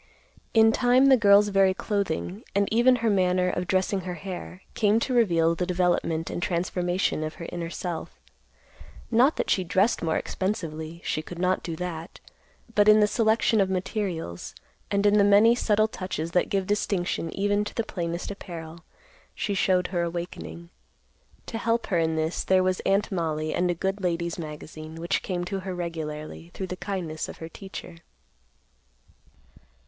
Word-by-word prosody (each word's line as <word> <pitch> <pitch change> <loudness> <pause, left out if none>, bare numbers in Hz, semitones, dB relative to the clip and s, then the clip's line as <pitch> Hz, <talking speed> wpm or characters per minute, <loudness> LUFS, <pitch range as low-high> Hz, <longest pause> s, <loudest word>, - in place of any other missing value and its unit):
In 225 0 +7
time, 250 +3 +4
the 265 - +8
girl's 205 -3 +5
very 195 -1 +3
clothing, 200 -1 -2
and 200 0 +3
even 240 +3 +5
her - - +4
manner 180 -1 +2
of 180 - -3
dressing 190 +1 +1
her 180 0 -5
hair, 185 +1 -7
came 215 0 +3
to 255 - -2
reveal 170 -9 +3
the 175 +1 -2
development 175 -2 0
and - - -4
transformation 180 -1 0
of 155 - -4
her 170 - -8
inner 170 -1 -4
self; 175 -1 -5 0.9
not 255 +7 +4
that - - -1
she 185 - +2
dressed 190 +6 +2
more 160 -1 0
expensively; 165 -4 -4
she 155 - -1
could 170 +2 -9
not 180 +1 +1
do 165 - -5
that; 170 -1 -6 0.5
but 205 0 +5
in 215 0 +7
the 210 - +6
selection 220 0 +2
of 190 - +1
materials, 185 - -3 0.3
and 200 0 +1
in 205 0 +5
the - - +6
many 205 +3 +6
subtle 215 -2 +2
touches 185 -6 -4
that 180 - +1
give 195 -1 0
distinction 185 -4 -1
even 205 +1 +1
to 210 - -7
the 230 - 0
plainest 170 -2 -4
apparel, 170 -4 -8 0.5
she 205 - -2
showed 185 -2 +2
her 175 -2 -1
awakening. 170 0 -5 0.7
To 225 - -5
help 230 +1 0
her 175 -5 +1
in 160 -1 +1
this, 160 +1 -1
there 185 -1 +3
was 185 0 +1
Aunt 200 +2 +2
Mollie 155 -4 -1
and 180 0 +1
a 175 - +1
good 190 +4 -2
ladies' 170 -1 -1
magazine, 155 0 -8
which 170 +3 -1
came 175 -2 -3
to 195 +2 -3
her 185 -1 -5
regularly, 160 -2 -5
through 190 - -3
the - - -4
kindness 180 -5 -4
of - - -9
her 160 - -7
teacher. 190 -2 -9
185 Hz, 170 wpm, -26 LUFS, 170-205 Hz, 0.9 s, the